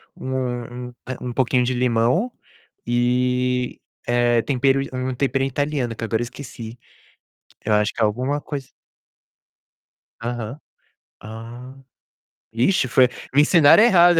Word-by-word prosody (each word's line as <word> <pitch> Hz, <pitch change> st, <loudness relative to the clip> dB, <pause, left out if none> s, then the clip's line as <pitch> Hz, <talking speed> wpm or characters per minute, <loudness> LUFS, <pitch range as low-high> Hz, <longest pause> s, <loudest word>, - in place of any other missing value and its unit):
um 125 Hz, -2 st, -4 dB
um, -, -, -15 dB
eh, 130 Hz, -, -4 dB
um 125 Hz, -, -4 dB
pouquinho 125 Hz, 0 st, +2 dB
de 125 Hz, +1 st, 0 dB
limão 125 Hz, -, +1 dB, 0.5 s
e, 125 Hz, +1 st, +1 dB, 0.3 s
eh, 120 Hz, -1 st, +3 dB
tempero 135 Hz, 0 st, +2 dB
um 130 Hz, 0 st, -2 dB
tempero 135 Hz, +1 st, 0 dB
italiano 135 Hz, -3 st, -1 dB
que 115 Hz, -, -7 dB
agora 115 Hz, 0 st, 0 dB
eu -, -, 0 dB
esqueci. 120 Hz, -2 st, -9 dB, 0.9 s
Eu 105 Hz, -, +2 dB
acho 105 Hz, 0 st, +2 dB
que -, -, -4 dB
é 110 Hz, -, +5 dB
alguma 130 Hz, +7 st, -1 dB
cois 140 Hz, -3 st, -6 dB, 1.5 s
Aham. 120 Hz, +1 st, -4 dB, 0.6 s
Ah, 115 Hz, +4 st, -9 dB, 0.8 s
vixe, 130 Hz, +6 st, +2 dB
foi 125 Hz, +1 st, +5 dB, 0.3 s
me 145 Hz, -, +6 dB
ensinaram 160 Hz, +5 st, +6 dB
errado. 175 Hz, -6 st, +6 dB
125 Hz, 125 wpm, -22 LUFS, 120-135 Hz, 1.5 s, me